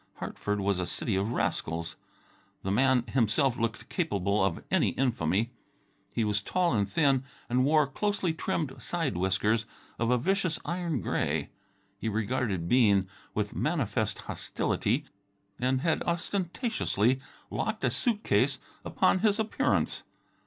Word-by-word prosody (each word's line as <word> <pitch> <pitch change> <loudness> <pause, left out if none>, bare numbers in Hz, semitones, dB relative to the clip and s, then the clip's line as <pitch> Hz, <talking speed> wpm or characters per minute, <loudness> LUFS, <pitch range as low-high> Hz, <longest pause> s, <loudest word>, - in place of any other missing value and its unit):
Hartford 105 0 -3
was 100 -1 +1
a 90 - -1
city 105 - -1
of 100 +4 0
rascals. 85 -7 -1 0.7
The 95 - -1
man 130 +3 +4
himself 120 +2 +2
looked 115 0 -2
capable 100 - 0
of 95 -3 0
any - - +3
infamy. 115 -3 +1 0.6
He 115 - 0
was 105 -2 +1
tall 175 - +1
and 100 -3 +1
thin, 135 +3 +3 0.2
and 125 +1 +2
wore 150 +1 +5
closely 190 +4 -1
trimmed 155 -3 -2
side 165 - -1
whiskers 100 +5 +1 0.3
of 115 0 +1
a 125 - +4
vicious 185 +4 +1
iron 170 -4 -1
gray. - - -1 0.5
He 110 - -1
regarded 110 -4 -1
Bean 100 -5 +4 0.3
with 105 -1 -1
manifest 120 -9 0
hostility - - -1 0.5
and 130 +1 +1
had 160 +1 +1
ostentatiously 170 - 0 0.3
locked - - -2
a - - +3
suit 225 -4 0
case - - +2 0.3
upon 185 - +2
his 210 +1 +3
appearance. 220 -1 0
125 Hz, 135 wpm, -29 LUFS, 105-160 Hz, 0.7 s, wore